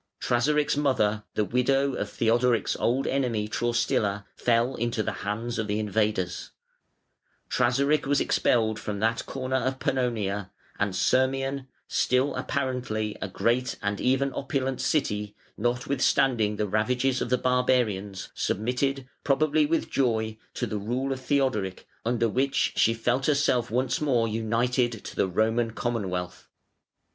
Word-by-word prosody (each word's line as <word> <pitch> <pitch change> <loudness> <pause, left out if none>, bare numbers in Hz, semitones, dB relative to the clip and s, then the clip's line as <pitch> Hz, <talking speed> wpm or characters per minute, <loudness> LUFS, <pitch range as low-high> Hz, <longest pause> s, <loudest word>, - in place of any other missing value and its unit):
Trasaric's 145 +5 +1
mother, 110 -7 +1
the 105 - +1
widow 135 +5 +1
of - - -3
Theodoric's 120 +1 +2
old 130 +4 +1
enemy, 120 -6 0
Traustila, 105 -3 0
fell 120 +2 +2
into 120 -2 -1
the - - -1
hands 115 +3 -3
of 110 - -1
the 105 0 -1
invaders; 105 -4 -1 1.0
Trasaric 140 +4 +2
was 140 -1 +3
expelled 110 -2 +2
from 105 -1 -4
that 115 +2 0
corner 130 -1 -2
of 130 0 -1
Pannonia, 105 -8 -1 0.3
and 100 -2 0
Sirmium, 135 +5 +1 0.2
still 130 +3 +1
apparently 125 -6 -2
a - - -2
great 120 +6 0
and 100 -1 -2
even 135 +1 +1
opulent 135 -1 -2
city, 105 -8 0 0.2
notwithstanding 120 -1 +1
the 105 0 -1
ravages 125 +5 +1
of - - -2
the 125 - +3
barbarians, 120 -7 0
submitted, 130 +5 -1 0.2
probably 150 +1 +2
with 165 +2 -1
joy, 110 -4 +1 0.2
to 120 - -1
the 105 -2 -3
rule 125 +6 -1
of 130 - -6
Theodoric, 130 -9 0 0.2
under 115 0 +1
which 135 +5 +1
she 115 - +3
felt 120 +4 0
herself 140 -5 +2
once 130 +7 0
more 125 -6 +2
united 115 +1 0
to - - -7
the - - +2
Roman 110 +5 +1
Commonwealth. 95 -8 -3
120 Hz, 135 wpm, -27 LUFS, 110-130 Hz, 1.0 s, was